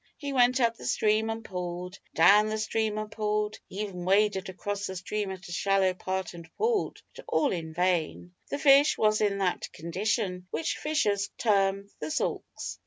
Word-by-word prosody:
He 285 -2 -4
went 250 0 +4
up 230 -2 +2
the - - -7
stream 215 +1 +2
and 225 0 -4
pulled, 180 0 -5 0.2
down 200 +6 +6
the 215 - -1
stream 220 0 -1
and 215 0 -4
pulled, 210 -1 -1
he 195 - -5
even 190 -4 -5
waded 195 +1 +2
across 200 +2 -4
the 190 - -6
stream 205 +2 -3
at 190 -1 -7
a - - -9
shallow 195 +1 +2
part 190 +1 -3
and 170 -1 -11
pulled, 445 -1 0
but - - -10
all 290 - +2
in 165 -3 -4
vain. 175 0 -1 0.2
The - - -2
fish 285 +1 +5
was 215 0 +2
in 205 -2 +2
that 190 -2 -1
condition 180 +2 -2
which 325 - -2
fishers 210 -10 0
term 195 -2 +2
"the 150 - -4
sulks." - - -3
200 Hz, 180 wpm, -28 LUFS, 185-220 Hz, 0.2 s, down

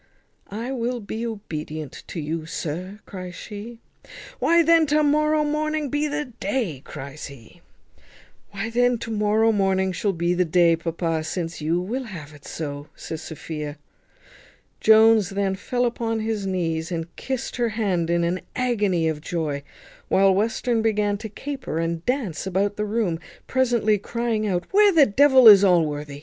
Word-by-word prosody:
"I 230 +6 -4
will 245 -1 -2
be 225 +2 -4
obedient 155 -8 -6
to 175 - -6
you, 155 +1 -4
sir," 180 +7 -5
cries 185 -2 -8
she. 215 +3 -8 0.6
"Why 335 0 +4
then 330 -1 +5
to 300 +2 +3
morrow 305 +1 +3
morning 305 0 -1
be 290 +3 0
the 295 0 -2
day," 205 - -3
cries 140 +2 -8
he. 140 +4 -15 0.9
"Why 205 +3 -4
then 245 +1 +2
to 230 0 -6
morrow 215 +1 +2
morning 190 -2 +1
shall 195 +3 -1
be 170 0 0
the 180 +1 +2
day, 170 0 +4
papa, 165 -1 -2
since 165 0 -4
you 165 +3 +1
will 240 +9 -3
have 160 -9 -9
it 145 -1 -16
so," 145 -2 -6
says 160 - -7
Sophia. 150 -2 -6 1.0
Jones 220 -2 +6
then 195 -1 -1
fell 245 +6 -1
upon 230 -1 -1
his 215 -3 -2
knees, 165 -3 -2
and 165 0 -4
kissed 260 -1 -4
her 240 -1 +1
hand 195 -7 -1
in 170 0 +2
an 175 +2 -1
agony 205 -10 +1
of 155 -1 -2
joy, 155 -4 -3 0.5
while 195 0 +4
Western 225 +3 0
began 210 -2 +1
to 220 0 -6
caper 270 - -5
and 165 0 -2
dance 240 - -1
about 195 +2 0
the 210 - -2
room, 205 -6 -1 0.3
presently 235 -5 +2
crying 225 0 -2
out 180 -3 -1
"Where 410 +1 +6
the 320 -6 +6
devil 265 +2 +6
is 205 -2 +10
Allworthy? 150 -6 +1
200 Hz, 160 wpm, -23 LUFS, 165-235 Hz, 1.0 s, is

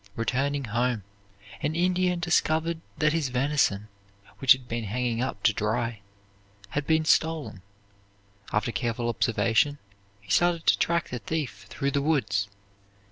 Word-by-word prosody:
Returning 135 +5 0
home, 120 -1 -1 0.6
an 150 +2 -1
Indian 180 0 +1
discovered 165 -1 +1 0.2
that 155 0 +2
his 160 -5 0
venison, 125 -6 +1 0.5
which 135 -3 +7
had 130 -2 -9
been 115 -1 -3
hanging 120 +2 -1
up 125 -6 -3
to - - +4
dry, 110 0 -1 0.7
had 145 +5 -3
been 160 0 +3
stolen. 155 - +1 0.9
After 105 +3 0
careful 120 0 -1
observation 115 +4 +2 0.4
he 100 -2 -10
started 175 -2 +2
to - - +5
track 170 0 +1
the 125 - -4
thief 110 -5 -4
through 140 0 -2
the 140 - +1
woods. 130 -9 +1
130 Hz, 135 wpm, -27 LUFS, 115-160 Hz, 0.9 s, which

